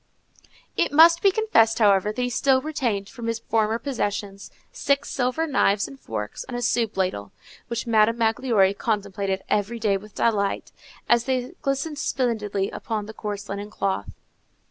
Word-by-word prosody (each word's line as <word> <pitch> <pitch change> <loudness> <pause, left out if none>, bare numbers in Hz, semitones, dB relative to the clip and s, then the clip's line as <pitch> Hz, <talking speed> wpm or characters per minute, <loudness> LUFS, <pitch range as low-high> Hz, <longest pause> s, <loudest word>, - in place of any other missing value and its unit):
_ - - -40 0.3
It - - +1
must 330 +3 +7
be 395 - +6
confessed, 370 - +3
however, 205 -2 +4
that 215 - -8
he 245 - 0
still 265 +2 +3
retained 245 -9 -2
from 235 0 -7
his 230 -1 -1
former 225 -1 0
possessions 205 -6 -4 0.2
six 280 -1 0
silver 255 +5 0
knives 210 -9 +2
and 270 - -12
forks 105 - -5
and 245 - -6
a - - -3
soup 230 -3 0
ladle, 140 - -1 0.4
which 235 0 -3
Madame 225 0 +3
Magloire 225 -3 +2
contemplated 200 -3 -2
every 210 +3 0
day 210 -3 +1
with 210 +1 -14
delight, 200 -4 0 0.4
as 240 0 +3
they 255 0 -1
glistened 280 +2 -2
splendidly 210 -8 -1
upon 215 -3 -4
the 220 - -9
coarse 205 -2 -5
linen 200 +1 -5
cloth. 195 - -2
225 Hz, 165 wpm, -24 LUFS, 200-250 Hz, 0.4 s, must